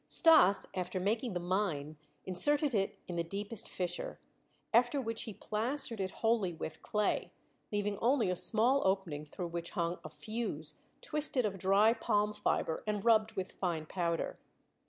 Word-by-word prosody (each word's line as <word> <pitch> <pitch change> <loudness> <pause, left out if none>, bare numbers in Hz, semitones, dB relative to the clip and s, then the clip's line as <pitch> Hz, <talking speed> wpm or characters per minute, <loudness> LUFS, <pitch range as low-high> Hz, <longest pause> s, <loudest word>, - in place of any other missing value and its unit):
Stas, 315 - +7
after 185 0 -3
making 220 +4 -1
the 175 - -1
mine, 175 -5 -1 0.3
inserted 285 - +3
it 195 -2 0
in 175 -2 -4
the 170 - +1
deepest 200 +5 -4
fissure, 190 - -4 0.5
after 245 +5 +4
which 225 -3 -2
he 220 - -6
plastered 230 +1 -2
it 190 - -1
wholly 225 -4 0
with 160 -1 -6
clay, 210 -1 0 0.4
leaving 205 -1 -1
only 240 -5 +2
a - - 0
small 235 +9 +3
opening 190 -6 0
through 175 +3 -5
which 170 0 -4
hung 170 0 -1
a 155 - -7
fuse 215 +11 -5 0.3
twisted 300 - 0
of 195 -2 -3
dry 200 +4 +4
palm 210 -2 0
fiber 205 -5 -1
and 210 -1 -2
rubbed 220 -1 +4
with 190 -3 -4
fine 170 -4 -2
powder. 170 0 -2
205 Hz, 155 wpm, -33 LUFS, 180-230 Hz, 0.5 s, Stas